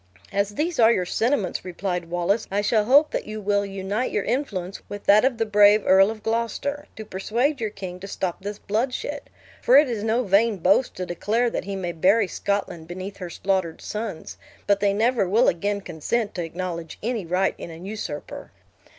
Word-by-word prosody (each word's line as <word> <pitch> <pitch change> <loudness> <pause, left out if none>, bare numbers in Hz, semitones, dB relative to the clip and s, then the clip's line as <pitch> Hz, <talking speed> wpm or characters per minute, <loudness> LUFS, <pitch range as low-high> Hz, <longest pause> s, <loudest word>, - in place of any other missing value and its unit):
"As 200 +1 -1
these 320 +3 -1
are 225 0 +7
your 185 -5 +1
sentiments," 225 +2 0
replied 180 -1 -3
Wallace, 175 +5 0
"I 200 +1 0
shall 210 +1 +2
hope 285 +6 +5
that - - -3
you 215 0 -5
will 205 0 +1
unite 200 +5 -2
your 205 - 0
influence 200 -9 -3
with 205 0 -7
that 205 +1 +6
of 255 -2 +2
the 225 - +1
brave 210 0 +5
Earl 195 +1 +6
of 220 -1 -7
Gloucester, 235 +6 -2
to 220 - -8
persuade 235 +8 -1
your 220 - 0
king 190 -3 -8
to 195 - -8
stop 185 -3 -3
this 205 +1 -5
bloodshed; 250 +8 -3 0.3
for 255 - +6
it 295 0 +6
is 225 -4 -3
no 225 +3 +1
vain 210 +1 +3
boast 190 +8 +2
to 185 - -4
declare, 220 +7 0
that - - -3
he 200 0 -4
may 180 -2 -3
bury 195 +6 +3
Scotland 195 -5 -3
beneath 185 +3 -7
her 180 -2 -6
slaughtered 185 -2 -1
sons, 210 -6 -6 0.3
but 200 -1 +3
they 200 0 +2
never 225 -1 +1
will 225 +6 +4
again 200 +4 0
consent 200 +6 -2
to 175 - -3
acknowledge 170 0 -5
any 230 -2 -1
right 180 +3 +1
in - - -7
an 165 +2 -10
usurper." 200 -8 -6
205 Hz, 195 wpm, -24 LUFS, 185-225 Hz, 0.3 s, are